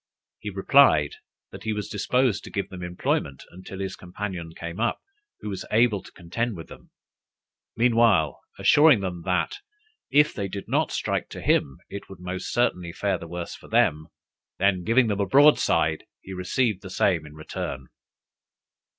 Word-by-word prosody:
He 105 - -5
replied, 95 - +4 0.4
that - - -10
he 110 -1 -2
was 105 -1 -4
disposed 115 0 +1
to - - -8
give 100 -1 -3
them 95 -1 -9
employment 90 -6 -2
until 95 +2 -10
his 95 0 -4
companion 90 -2 -6
came 85 +2 -7
up, 120 +1 +1 0.4
who 105 - -5
was 95 -2 -4
able 110 -3 +3
to - - -15
contend 100 +5 -3
with 80 - -10
them; - - -14 0.9
meanwhile 115 -9 +3 0.2
assuring 145 -7 +6
them 90 -3 -4
that, 95 - 0 0.5
if 150 +1 +4
they 100 -3 -3
did 100 +1 -7
not - - +1
strike - - -2
to - - -8
him, 65 - +1
it 100 - -8
would 95 -2 -11
most 90 +1 -5
certainly 90 -8 0
fare 95 0 -1
the 85 - -8
worse 85 0 -6
for - - -13
them: 75 +1 +2 0.5
then 95 -2 +2
giving 120 +6 +4
them 105 -2 -1
a 100 - +1
broadside, 135 - +4
he 95 - -10
received 95 +3 0
the 95 - -9
same 90 -3 +1
in 75 - -13
return. 75 -3 -5
95 Hz, 170 wpm, -25 LUFS, 90-110 Hz, 0.9 s, assuring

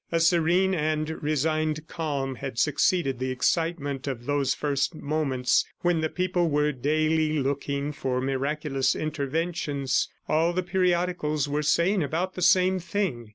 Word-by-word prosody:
A 165 - +2
serene 175 +3 +3
and 155 -1 -1
resigned 155 +1 0
calm 140 -5 -3
had 130 -1 -6
succeeded 145 0 +1
the 130 0 -2
excitement 145 +1 -1
of 120 -3 -4
those 140 -2 +1
first 145 +2 -1
moments 140 -5 +1 0.2
when 175 -2 +2
the 160 - 0
people 180 -1 0
were 150 0 +2
daily 155 +3 +1
looking 140 +1 -1
for 130 -3 -2
miraculous 135 +1 0
interventions. 155 -1 -1 0.2
All 165 +3 +2
the 185 +1 -1
periodicals 175 -5 0
were 145 +1 -1
saying 170 +6 +2
about 165 +6 -1
the 180 - -6
same 185 +2 +4
thing. 175 - -3
155 Hz, 140 wpm, -26 LUFS, 140-170 Hz, 0.2 s, same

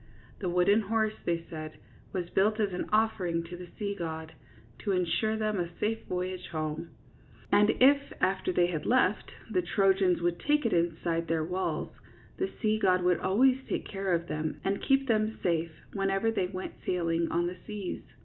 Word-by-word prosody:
The 185 - -2
wooden 180 +5 +4
horse, 220 +1 +1
they 170 -1 -1
said, 155 -1 -7 0.3
was 180 -2 -3
built 215 +3 +2
as 205 -3 +1
an 180 - -3
offering 200 -6 +1
to 170 +1 -8
the 180 0 -9
sea 200 -1 -2
god, 160 -4 -5 0.5
to 200 - -1
insure 185 +5 +1
them 215 -2 0
a 170 -1 -1
safe 225 +1 -1
voyage 180 0 -3
home; 155 0 -3 0.6
and 210 +1 +5
if, 280 +2 +5
after 185 0 +1
they 175 -1 +3
had 160 -4 -3
left, 225 -5 +2 0.2
the 185 -4 +2
Trojans 190 0 +3
would 175 0 0
take 295 -2 +2
it 230 - +2
inside 170 0 0
their 160 -1 0
walls, 180 +3 -2 0.5
the 380 - -1
sea 215 0 +2
god 185 -3 +3
would 180 -1 +3
always 255 +7 +3
take - - -2
care 195 -2 0
of 170 0 -3
them 155 0 -3
and 195 +1 0
keep 270 0 +2
them 220 -1 +1
safe 165 -2 +1 0.2
whenever 195 +2 +1
they 190 -5 0
went 185 0 -6
sailing 170 -2 0
on 170 +1 +1
the 180 +1 -4
seas. 205 -3 -4
185 Hz, 180 wpm, -30 LUFS, 170-215 Hz, 0.6 s, and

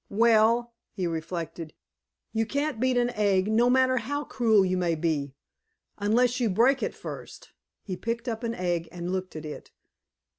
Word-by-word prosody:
"Well," 230 +2 +3 0.2
he 185 - -3
reflected, 165 -1 -4 0.6
"you 225 -1 0
can't 285 -1 -1
beat 255 0 +2
an 245 0 +2
egg, 200 -4 +2
no 230 +3 +3
matter 255 0 +3
how 285 +5 -2
cruel 220 -8 +3
you 185 0 0
may 175 -2 +1
be, 150 -4 -1 0.6
unless 240 +5 +2
you 235 -3 +1
break 245 +8 +3
it - - -2
first." - - -9 0.3
He 190 - -4
picked 230 +5 -4
up 225 0 -3
an 230 0 -2
egg 175 -3 -2
and 175 +1 -5
looked 185 -2 -3
at 155 0 -6
it. 150 - -8
220 Hz, 170 wpm, -27 LUFS, 180-240 Hz, 0.6 s, Well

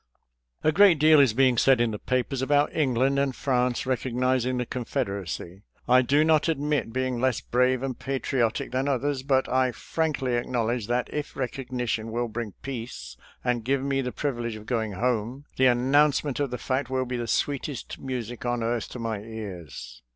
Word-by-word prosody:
« - - -46 0.4
• - - -9
♦ - - +3
A - - +6
great 185 0 +6
deal 155 +1 +6
is 130 -6 +4
being 130 -2 +4
said 135 -2 +5
in 120 -1 +2
the 105 - -5
papers 130 +1 -1
about 145 +2 +2
England 135 -2 +2
and 140 -2 0
France 125 -2 0
recognizing 130 0 0
the 125 - -1
Confeder 100 -5 -3
acy. 90 +1 -7 0.3
I 125 +1 +6
do 140 +4 +3
not 155 0 +3
admit 150 -5 0
being 130 -1 -1
less 130 -3 +2
brave 125 +1 +1
and 130 -3 -4
patri 135 0 -2
otic 115 -2 0
than 130 +2 0
others, 140 0 0
but 135 -1 +1
I 130 0 +2
frankly 145 -1 -2
acknowledge 120 -2 -1
that 120 +1 0
if 150 -1 -4
recognition 125 -4 -3
will 120 +1 -1
bring 110 -3 -5
peace 125 -3 -6 0.3
and 125 -2 0
give 135 +3 0
me 135 -1 0
the 125 -1 -3
privilege 120 -6 -3
of 110 0 -10
going 110 -4 -1
home, 120 +5 -1
the 130 - +5
announcement 140 +3 +3
of 140 -2 0
the 125 - -4
fact 130 +1 -2
will 130 0 0
be 125 0 -3
the 120 -1 -3
sweetest 140 +1 -2
music 120 -3 -5
on 120 -1 -1
earth 115 -1 -1
to - - -8
my 115 -3 -3
ears. 90 - -8
125 Hz, 195 wpm, -26 LUFS, 120-135 Hz, 0.4 s, A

